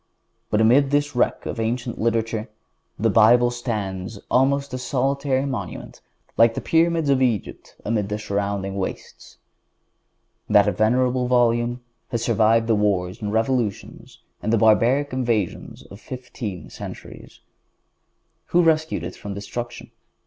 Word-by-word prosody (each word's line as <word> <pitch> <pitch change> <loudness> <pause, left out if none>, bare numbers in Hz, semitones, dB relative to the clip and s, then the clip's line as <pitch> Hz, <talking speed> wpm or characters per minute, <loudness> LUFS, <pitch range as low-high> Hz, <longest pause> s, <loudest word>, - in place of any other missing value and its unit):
But 105 - +2
amid 130 +5 +4
this 145 0 0
wreck 125 - 0
of - - -4
ancient 120 +2 -2
literature, 115 0 -1 0.5
the - - +1
Bible 120 +3 +5
stands 105 -5 -4
almost 140 +1 +2
a 130 - -3
solitary 135 +1 0
monument 120 -10 -6 0.4
like 115 0 +5
the - - -1
Pyramids 165 -2 +2
of 135 -1 +2
Egypt 120 -6 -2
amid 105 -2 -1
the 105 - -2
surrounding 100 -2 -3
wastes. 95 - -6 1.1
That - - +4
venerable 125 +3 +2
Volume 120 0 +2 0.3
has 115 -1 -3
survived 115 0 +3
the 115 - +2
wars 100 -3 0
and 105 -1 -3
revolutions 115 -1 -2 0.2
and 110 - -1
the 115 - +4
barbaric 120 +6 +3
invasions 115 -7 -2
of 100 - -13
fifteen 120 -5 -7
centuries. - - -10 1.1
Who 175 0 +3
rescued 160 -1 +1
it - - -6
from 100 -1 -7
destruction? 120 +4 -7
115 Hz, 130 wpm, -22 LUFS, 105-130 Hz, 1.1 s, Bible